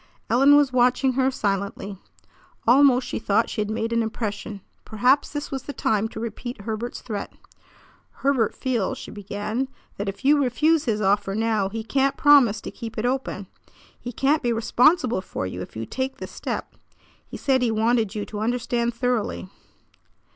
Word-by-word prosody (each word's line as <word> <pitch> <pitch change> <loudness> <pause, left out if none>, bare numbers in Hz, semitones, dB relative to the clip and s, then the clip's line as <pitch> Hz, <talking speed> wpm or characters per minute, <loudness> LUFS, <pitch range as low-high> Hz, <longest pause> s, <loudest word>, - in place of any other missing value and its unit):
Ellen 275 +5 +6
was 285 -3 +4
watching 250 +1 +3
her 260 +1 +2
silently. 200 -4 -3 0.7
Almost 255 0 +5
she - - -3
thought 220 +1 +1
she 215 - -2
had 210 - -2
made 225 +1 -2
an 230 - +2
impression. 215 -2 -4 0.2
Perhaps 250 +6 +2
this 290 -1 -5
was 270 -1 -3
the 285 - -7
time 215 -4 0
to 220 - -8
repeat 235 0 -6
Herbert's 225 +3 -4
threat. 210 -4 -5 0.9
"Herbert 265 -6 +2
feels," 255 -1 -1
she - - -9
began, 210 +5 -3 0.3
"that 200 0 -2
if 200 +7 -8
you 290 +1 +5
refuse 305 +5 +2
his 215 -4 0
offer 195 0 +1
now 220 -3 +1
he 225 +2 -5
can't 275 +3 +1
promise 260 -8 +5
to - - -7
keep 230 -2 -8
it 220 - -1
open. 250 -6 -2 0.5
He 245 - -6
can't 280 +6 +1
be 240 - 0
responsible 245 - +3
for 185 - -5
you 90 0 -5
if 90 - -9
you 110 +1 -4
take 265 - -3
this - - -8
step. - - -5 0.5
He - - -9
said 265 -2 +1
he 245 - +2
wanted 220 -1 +1
you 210 - -3
to 210 - -7
understand 235 +1 -1
thoroughly." 240 -6 -1
235 Hz, 175 wpm, -24 LUFS, 210-260 Hz, 0.9 s, Ellen